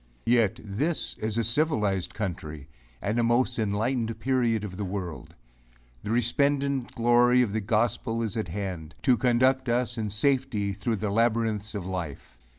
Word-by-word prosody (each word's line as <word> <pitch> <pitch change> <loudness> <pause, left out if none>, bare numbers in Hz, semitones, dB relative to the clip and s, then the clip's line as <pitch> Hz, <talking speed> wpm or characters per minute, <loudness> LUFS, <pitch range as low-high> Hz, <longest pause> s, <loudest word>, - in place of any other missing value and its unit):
Yet 115 -3 +3
this 135 +11 -2
is 110 0 -2
a 115 - +2
civilized 110 - +1
country 80 -8 -5 0.4
and 110 +4 0
a - - +3
most 120 +1 +2
enlightened 110 +2 -1
period 120 -2 +1
of 95 -3 -6
the 100 - -4
world! 95 -4 -5 0.7
The - - -6
resplendent 135 +3 +1
glory 120 +1 +4
of 110 - -2
the 110 +1 -1
gospel 115 +2 0
is 110 -4 -3
at 110 -4 -2
hand, 85 -3 -5
to 130 -3 +5
conduct 130 +1 +2
us 120 0 0
in 110 -1 -2
safety 110 -2 0
through 105 +4 -1
the 105 0 -2
labyrinths 110 -1 +1
of 100 -4 -4
life. 90 -10 -5
115 Hz, 155 wpm, -27 LUFS, 100-120 Hz, 0.7 s, to